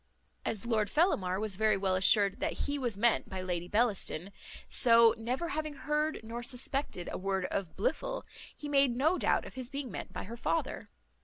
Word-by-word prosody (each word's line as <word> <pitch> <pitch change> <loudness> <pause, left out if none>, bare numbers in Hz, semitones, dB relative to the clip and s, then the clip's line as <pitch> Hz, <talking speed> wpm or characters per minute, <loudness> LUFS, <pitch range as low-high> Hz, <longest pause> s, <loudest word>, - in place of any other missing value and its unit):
As 220 +1 -3
Lord 215 -4 +1
Fellamar 195 - +1
was 210 -3 0
very 215 -1 +3
well 190 -1 +1
assured 195 +1 +5
that - - -1
he 285 0 -2
was 240 -6 -1
meant 230 +2 +2
by 190 - -5
Lady 175 -2 -3
Bellaston, 205 -4 0 0.4
so, 230 -2 +6
never 250 +9 -3
having 310 -3 -3
heard 300 +3 -1
nor 230 +2 -6
suspected 250 -5 -3
a - - -4
word 190 -1 -1
of 190 -5 -3
Blifil, - - -1 0.3
he 295 - -7
made 275 -4 +3
no 315 +8 +2
doubt - - +1
of - - -10
his 255 -2 -6
being 275 -3 -5
meant - - -6
by - - -6
the 230 +4 -7
father. 165 -8 -2
230 Hz, 185 wpm, -31 LUFS, 195-275 Hz, 0.4 s, so